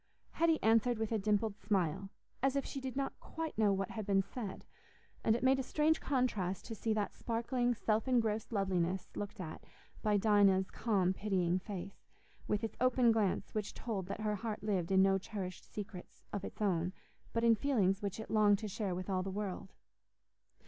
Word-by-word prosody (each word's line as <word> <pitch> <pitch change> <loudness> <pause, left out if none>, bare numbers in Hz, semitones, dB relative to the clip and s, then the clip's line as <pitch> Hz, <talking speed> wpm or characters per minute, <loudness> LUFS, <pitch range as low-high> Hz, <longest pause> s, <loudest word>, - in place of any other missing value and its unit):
Hetty 330 -1 +3
answered 230 +2 +4
with 220 0 -2
a 220 - +1
dimpled 210 +1 0
smile, 195 -2 0 0.3
as 270 +1 +2
if 275 - 0
she 275 - -5
did 260 -1 -5
not 275 0 -2
quite 325 -1 -5
know 215 -2 +3
what 195 -1 -1
had 220 - -4
been 195 -1 +3
said; 200 0 -6 0.6
and 220 - +4
it 240 - -3
made 265 +1 +4
a - - +2
strange 305 +4 +2
contrast 215 -9 0
to 230 - -5
see 225 +1 -2
that 210 -1 -1
sparkling 240 +1 0
self 220 +2 0
engrossed 225 -4 +1
loveliness 190 -3 0
looked 205 0 -5
at 160 -4 -6 0.4
by 210 -1 +3
Dinah's 200 -2 +4
calm 190 -5 +1
pitying 185 -3 +1
face, 195 -1 -8 0.4
with 210 +2 0
its 225 - -3
open 250 -2 +5
glance 215 -4 0
which 210 -2 -3
told 200 -6 -3
that 200 - -5
her 210 -1 0
heart 220 0 -4
lived 195 -4 0
in 190 0 +6
no 195 0 +4
cherished 185 -2 -6
secrets 195 -3 -8
of 200 - -2
its 215 - -5
own, 180 -2 +1 0.4
but 230 - 0
in 230 -1 +7
feelings 210 -6 +2
which 200 0 -3
it 220 - -7
longed 210 -2 +5
to 215 +1 -5
share 195 -2 -2
with 185 0 -5
all 190 -2 0
the 190 - -3
world. 195 -1 -4
210 Hz, 190 wpm, -35 LUFS, 190-230 Hz, 0.6 s, in